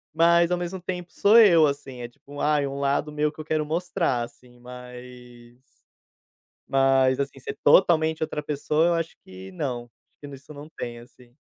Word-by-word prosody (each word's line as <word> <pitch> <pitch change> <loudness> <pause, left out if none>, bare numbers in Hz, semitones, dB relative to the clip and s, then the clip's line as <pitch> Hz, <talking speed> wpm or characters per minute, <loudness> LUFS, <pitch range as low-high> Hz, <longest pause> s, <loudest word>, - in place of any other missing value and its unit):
mas 170 +1 +4
ao 180 - +1
mesmo 175 +2 -5
tempo 180 -1 -6
sou 215 +3 +5
eu, 170 -8 +6
assim. 140 -3 -4
É 120 - -5
tipo, 140 +4 -14
ai, 150 -2 +1
um 140 +1 -6
lado 140 +2 0
meu 150 0 0
que - - -19
eu - - -11
quero 155 -1 -1
mostrar, 165 -5 -1
assim, 120 +1 -11
mas 125 -1 -12 1.1
mas, 135 -1 +3
assim, 140 -1 -4
ser - - -7
totalmente 160 -1 +4
outra 150 - -4
pessoa, 150 +3 0
eu 175 - +2
acho 165 -1 -3
que 95 0 -11
não. 120 +4 -4
Acho 120 - -28 0.3
que 145 - -9
nisso 140 +1 -12
não 145 +2 -11
tem, 120 -1 -6
assim. 120 0 -19
140 Hz, 185 wpm, -24 LUFS, 125-160 Hz, 1.1 s, eu